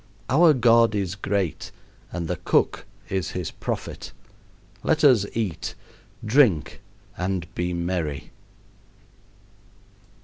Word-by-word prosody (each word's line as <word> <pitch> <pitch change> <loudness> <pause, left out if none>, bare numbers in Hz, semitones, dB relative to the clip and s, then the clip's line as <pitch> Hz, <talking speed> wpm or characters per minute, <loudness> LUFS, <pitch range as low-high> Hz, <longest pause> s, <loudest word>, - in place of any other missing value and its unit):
Our 155 +2 +6
God 115 -2 +4
is 95 -3 -1
great 100 -3 -2 0.4
and 85 -1 -4
the 90 +1 -2
cook - - 0 0.2
is 95 -2 -1
his 90 -3 -3
prophet. - - -5 0.7
Let 155 +6 +1
us 120 -8 +5
eat, 105 -8 -3 0.5
drink, 110 - +3 0.4
and 90 -1 -1
be 90 0 -2
merry. 85 -5 -3
95 Hz, 100 wpm, -24 LUFS, 90-115 Hz, 0.7 s, Our